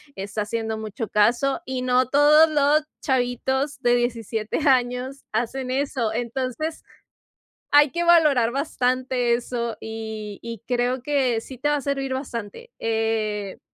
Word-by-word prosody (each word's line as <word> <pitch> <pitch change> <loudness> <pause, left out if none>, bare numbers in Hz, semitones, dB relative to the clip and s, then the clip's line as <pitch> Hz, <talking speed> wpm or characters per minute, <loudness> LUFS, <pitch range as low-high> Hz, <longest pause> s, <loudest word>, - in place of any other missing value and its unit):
está 205 +2 -4
haciendo 220 +1 -3
mucho 220 0 -5
caso 240 +9 +2
y 260 -1 -3
no 255 0 +2
todos 300 +3 +6
los 295 0 +3 0.2
chavitos 265 +2 -1
de 240 0 +3
17 230 -2 -2
años 255 +1 0
hacen 250 +3 -2
eso. 265 -4 -1
Entonces, 255 +6 -3 0.9
hay 290 -1 +6
que 345 0 -1
valorar 300 -9 +5
bastante 255 -3 0
eso, 235 -1 -2
y 220 -2 -6
y 230 -3 -7
creo 245 +1 0
que 260 -4 +1
sí 255 +3 -10
te 295 +4 0
va 295 - +2
a 285 - -4
servir 275 -1 -2
bastante. 260 - -6
Eh. 220 -3 -1
250 Hz, 135 wpm, -23 LUFS, 225-275 Hz, 0.9 s, todos